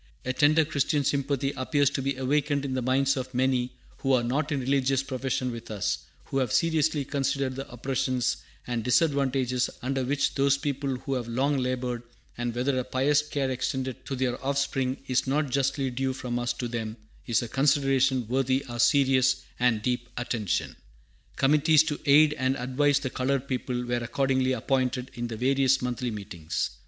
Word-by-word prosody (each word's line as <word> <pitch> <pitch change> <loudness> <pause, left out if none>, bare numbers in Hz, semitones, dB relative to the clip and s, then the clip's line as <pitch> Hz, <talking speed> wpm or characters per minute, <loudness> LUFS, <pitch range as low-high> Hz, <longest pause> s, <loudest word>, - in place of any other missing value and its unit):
"A 130 - 0
tender 155 +3 +4
Christian 145 0 0
sympathy 140 0 0
appears 140 +1 +1
to 140 - -2
be 135 0 -1
awakened 140 +2 0
in 135 - -2
the 130 - -1
minds 135 +2 +2
of 130 -1 -5
many 125 -1 +1 0.3
who 135 -1 0
are 125 -2 +3
not 140 +6 -1
in 145 - 0
religious 135 0 +1
profession 130 -1 -2
with 115 -1 -8
us, 105 -1 -1 0.3
who 135 - -1
have 125 -5 0
seriously 155 -3 +2
considered 140 -1 -1
the 135 +1 -6
oppressions 130 - -1 0.3
and 120 -2 -2
disadvantages 130 -1 +2
under 135 +1 -1
which 135 +2 0
those 140 0 +3
people 140 -2 -2 0.2
have 120 -2 -3
long 135 +5 +1
labored; 125 -1 -2 0.3
and 120 -1 -3
whether 130 +2 +1
a - - -1
pious 135 +3 +2
care 140 -3 -2
extended 130 0 -3
to 135 - -2
their 125 0 -2
offspring 135 -1 0
is 130 0 0
not 145 0 0
justly 135 0 0
due 130 +1 -1
from 125 -2 -3
us 120 0 0
to 120 0 -4
them 115 -1 -4 0.3
is 115 0 +2
a - - -4
consideration 135 -2 +2
worthy 130 +2 +1
our 120 -2 -7
serious 130 -2 +3 0.2
and 120 -3 +2
deep 125 0 -1
attention." 115 -5 -2 0.6
Committees 150 +3 +4
to 150 -2 -3
aid 150 +2 +6
and 130 +1 +1
advise 135 +3 +2
the 130 -3 -3
colored 135 +1 -1
people 125 -1 -2
were 120 0 0
accordingly 130 +2 0
appointed 130 +1 -1
in 120 -2 -4
the 115 -2 -6
various 135 +2 +3
Monthly 125 0 -2
Meetings. 95 -7 -4
130 Hz, 175 wpm, -27 LUFS, 125-140 Hz, 0.6 s, aid